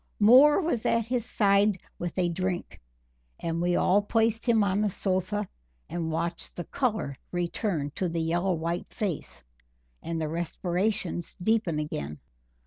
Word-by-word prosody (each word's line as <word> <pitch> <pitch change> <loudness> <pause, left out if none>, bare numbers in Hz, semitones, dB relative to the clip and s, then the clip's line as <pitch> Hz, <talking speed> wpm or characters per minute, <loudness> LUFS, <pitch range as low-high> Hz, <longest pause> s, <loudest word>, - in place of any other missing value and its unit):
Moore 255 - +7
was 315 - -1
at 230 -1 +2
his 245 0 -1
side 200 -1 +3 0.2
with 175 0 -4
a 180 -1 +2
drink, 180 +1 -3 0.6
and 165 0 -2
we 175 0 +2
all 200 +3 +4
placed 225 +2 +1
him 225 -3 +5
on 200 +1 +1
the 210 - +2
sofa 190 +2 +1 0.4
and 165 -2 -3
watched 170 +1 -2
the 175 - -4
color 215 - -1 0.2
return 175 -3 -2
to 185 - -1
the 165 0 -2
yellow 175 +3 +1
white 170 +2 -3
face, 190 - -4 0.6
and 165 -1 -3
the 155 - -1
respirations 175 +3 -2
deepen 190 -4 +1
again. 75 - -4
185 Hz, 145 wpm, -27 LUFS, 170-215 Hz, 0.6 s, Moore